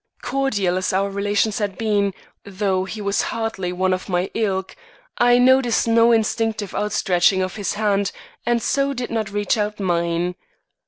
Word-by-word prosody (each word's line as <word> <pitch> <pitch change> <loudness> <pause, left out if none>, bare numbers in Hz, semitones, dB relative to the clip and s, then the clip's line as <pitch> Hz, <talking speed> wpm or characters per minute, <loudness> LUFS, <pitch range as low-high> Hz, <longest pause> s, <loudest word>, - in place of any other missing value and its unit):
Cordial 205 -10 0
as 185 0 -1
our 195 +1 0
relations 205 +2 0
had 200 -3 -2
been 205 -3 0 0.3
though 190 -1 -1
he 215 +3 -7
was 200 0 0
hardly 225 -5 -3
one 185 +1 +1
of 185 +1 -4
my 180 0 -1
ilk 190 -4 -2 0.4
I 245 0 +5
noted 250 -1 +4
no 230 0 +4
instinctive 225 -2 0
outstretching 190 -2 +2
of 185 - -4
his 205 -3 -2
hand, 200 -2 +1 0.3
and 235 -1 0
so 275 0 +1
did 245 -1 -4
not 220 -3 -1
reach 205 +1 0
out 210 0 -2
mine. 170 -1 0
205 Hz, 160 wpm, -21 LUFS, 190-225 Hz, 0.4 s, I